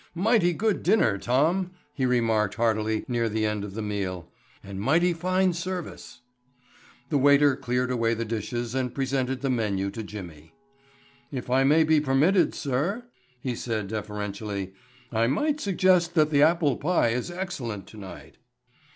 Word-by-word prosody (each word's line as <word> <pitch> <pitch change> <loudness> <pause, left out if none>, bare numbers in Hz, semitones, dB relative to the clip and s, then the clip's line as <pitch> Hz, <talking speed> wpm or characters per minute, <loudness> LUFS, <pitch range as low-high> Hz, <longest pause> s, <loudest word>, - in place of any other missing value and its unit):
"Mighty 195 -1 +3
good 210 +5 0
dinner, 140 - +2
Tom," 165 - +1 0.2
he 130 -3 0
remarked 115 -4 +1
heartily 110 -1 0
near 120 -3 0
the 110 0 -1
end 105 -1 -1
of 100 -1 -7
the 110 - -3
meal, 95 -4 -4 0.3
"and 100 0 -7
mighty 170 - +3
fine 185 +2 +1
service." 175 -7 -6 0.9
The 145 - +2
waiter 145 0 +5
cleared 125 -1 -1
away 115 -2 +1
the 115 +1 -3
dishes 115 +2 -3
and 130 -2 -2
presented 130 -1 -1
the 135 -2 0
menu 100 -5 -1
to 110 - -6
Jimmy. 85 -7 -10 0.8
"If 125 -3 -5
I 130 +1 +4
may 155 +4 +5
be 155 -1 +3
permitted, 150 +7 +3
sir," 155 - -1 0.4
he 125 -1 -2
said 110 -4 -3
deferentially, 105 -2 -4 0.4
"I 115 0 +2
might 295 - 0
suggest 185 -4 +2
that 155 -1 +3
the 145 -1 +4
apple 155 -4 +3
pie 165 -5 +2
is 125 +7 -2
excellent 140 - -5
tonight." 100 -3 -11
125 Hz, 150 wpm, -26 LUFS, 110-165 Hz, 0.9 s, waiter